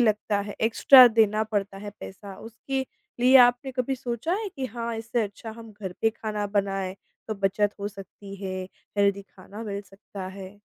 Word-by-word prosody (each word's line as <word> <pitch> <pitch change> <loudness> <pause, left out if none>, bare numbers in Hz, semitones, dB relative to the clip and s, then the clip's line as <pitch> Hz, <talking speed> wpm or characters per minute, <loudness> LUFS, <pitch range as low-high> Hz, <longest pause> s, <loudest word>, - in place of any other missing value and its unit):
लगता 215 -2 +2
है, 205 0 -6
एक्स्ट्रा 250 +3 +8
देना 215 -1 +3
पड़ता 200 -2 -3
है 205 0 -7
पैसा। 195 0 -9
उसके 265 +4 -4 0.3
लिए 255 +2 +7
आपने 245 +2 -2
कभी 255 +1 -1
सोचा 245 +7 -3
है 415 - -3
कि 260 -1 -2
हाँ, 235 0 -4
इससे 225 +1 -1
अच्छा 210 +2 -6
हम 225 -2 -11
घर 195 -3 -7
पे 225 - +4
खाना 210 -2 -4
बनाएँ, 195 -1 -2 0.3
तो 215 - -1
बचत 200 +1 +1
हो 205 - -2
सकती 195 0 -11
है, 185 0 -3 0.3
हेल्दी 200 0 +3
खाना 200 +3 -11
मिल 200 -1 -4
सकता 195 -1 -10
है? 195 +1 -10
210 Hz, 180 wpm, -26 LUFS, 195-230 Hz, 0.3 s, एक्स्ट्रा